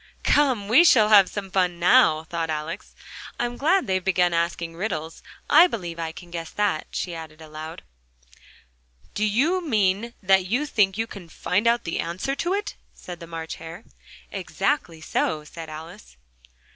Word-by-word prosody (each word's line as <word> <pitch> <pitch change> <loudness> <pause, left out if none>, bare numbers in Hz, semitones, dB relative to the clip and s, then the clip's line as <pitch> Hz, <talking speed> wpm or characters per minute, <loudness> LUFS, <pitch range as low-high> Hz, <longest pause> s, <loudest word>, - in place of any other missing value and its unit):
"Come, 255 -9 +2
we 245 +11 +7
shall 225 -10 +6
have 200 -3 +7
some 195 -2 -6
fun 180 -2 +1
now!" 175 -3 +5
thought 165 0 -4
Alice. 155 +5 -5 0.4
"I'm 240 0 -1
glad 330 +9 +2
they've 185 -1 -1
begun 180 -2 +2
asking 170 0 -1
riddles 165 -4 -4 0.3
I 330 +4 +7
believe 175 - -5
I 165 -1 -3
can 175 +1 -13
guess 165 -1 -5
that," 205 -6 -1
she 175 - -4
added 160 -1 -9
aloud. 155 0 -9 1.3
"Do 210 - -2
you 285 - +2
mean 215 - 0
that 190 -1 +3
you 250 +9 0
think 205 -8 +1
you 225 - 0
can 195 -6 -11
find 190 +7 -1
out 235 +1 +3
the 165 - -3
answer 175 +11 -2
to 345 +5 -2
it?" 415 0 -3 0.2
said 175 -2 -9
the 170 - -10
March 165 -1 -6
Hare. 165 +5 -10 0.5
"Exactly 170 - -2
so," 155 -1 -1
said 160 +1 -9
Alice. 155 - -11
180 Hz, 165 wpm, -24 LUFS, 165-225 Hz, 1.3 s, we